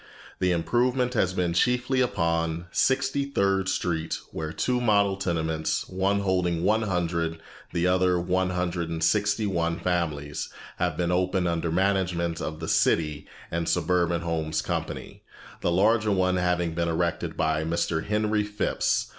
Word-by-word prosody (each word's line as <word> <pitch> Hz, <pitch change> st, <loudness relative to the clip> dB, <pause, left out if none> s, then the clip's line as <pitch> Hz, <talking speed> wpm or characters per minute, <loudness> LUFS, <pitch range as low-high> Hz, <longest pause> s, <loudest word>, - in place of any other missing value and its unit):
The 90 Hz, -1 st, +2 dB
improvement 125 Hz, +8 st, +1 dB
has 95 Hz, -6 st, +1 dB
been 90 Hz, -2 st, 0 dB
chiefly 125 Hz, +6 st, +2 dB
upon 85 Hz, -6 st, 0 dB
Sixty 135 Hz, +1 st, +1 dB
third 95 Hz, -7 st, +1 dB
Street 80 Hz, -4 st, -1 dB
where 80 Hz, -1 st, -4 dB
two 125 Hz, +8 st, 0 dB
model 100 Hz, -4 st, +3 dB
tenements, 80 Hz, -4 st, -1 dB
one 95 Hz, +2 st, 0 dB
holding 90 Hz, -3 st, 0 dB
one 110 Hz, +4 st, +3 dB
hundred, 85 Hz, -4 st, -1 dB, 0.3 s
the 85 Hz, 0 st, 0 dB
other 90 Hz, 0 st, +3 dB
one 90 Hz, +1 st, 0 dB
hundred 90 Hz, -2 st, -2 dB
and 80 Hz, -1 st, -3 dB
sixty 105 Hz, +3 st, +2 dB
one 85 Hz, -4 st, 0 dB
families, 75 Hz, -5 st, -2 dB, 0.3 s
have -, -, -1 dB
been 90 Hz, 0 st, 0 dB
opened 90 Hz, 0 st, +1 dB
under 85 Hz, 0 st, -1 dB
the 80 Hz, -, -1 dB
management 90 Hz, -3 st, 0 dB
of 80 Hz, 0 st, -4 dB
the 80 Hz, -, -5 dB
City 75 Hz, -3 st, +1 dB, 0.2 s
and 85 Hz, 0 st, -1 dB
Suburban 85 Hz, -2 st, +1 dB
Homes 80 Hz, -2 st, -1 dB
Company, -, -, -4 dB, 0.4 s
the 85 Hz, -, +1 dB
larger 105 Hz, +4 st, +3 dB
one 95 Hz, -1 st, +2 dB
having 90 Hz, -2 st, 0 dB
been 85 Hz, 0 st, 0 dB
erected 85 Hz, 0 st, -1 dB
by 80 Hz, -1 st, +1 dB
Mr. 80 Hz, 0 st, -1 dB
Henry 105 Hz, 0 st, +1 dB
Phipps. 105 Hz, 0 st, 0 dB
90 Hz, 150 wpm, -26 LUFS, 85-100 Hz, 0.4 s, model